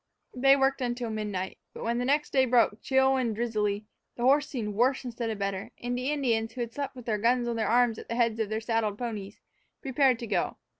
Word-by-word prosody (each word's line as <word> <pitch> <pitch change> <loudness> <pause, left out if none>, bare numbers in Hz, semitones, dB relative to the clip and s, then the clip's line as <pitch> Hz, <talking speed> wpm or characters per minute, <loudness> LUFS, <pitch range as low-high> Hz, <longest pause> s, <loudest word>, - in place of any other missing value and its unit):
They 270 +2 +5
worked 270 0 +1
until 240 -2 -2
midnight. 205 -3 -4 0.2
But - - -7
when 235 +1 0
the 245 - -1
next 290 +3 +1
day 265 -1 +4
broke, 230 -3 +3
chill 265 0 +3
and 235 -4 0
drizzily, 210 -3 -1 0.3
the 240 - -4
horse 285 +3 +4
seemed 215 -6 -3
worse 255 +5 +1
instead 235 -1 -3
of 220 - -3
better, 195 -1 -3
and 245 0 -3
the 255 +2 -2
Indians, 230 -6 0
who 255 - -5
had 235 -1 -4
slept 280 -1 -4
with 250 -2 -10
their 215 -3 0
guns 240 +2 +2
on 235 - -1
their 225 -1 0
arms 240 -1 +3
at - - -11
the 230 - -2
heads 230 -2 +1
of 220 -2 -1
their 220 +1 -2
saddled 225 -3 0
ponies, 215 -4 -5 0.4
prepared 265 -2 +3
to 235 - -6
go. 220 - -1
235 Hz, 235 wpm, -28 LUFS, 220-255 Hz, 0.4 s, They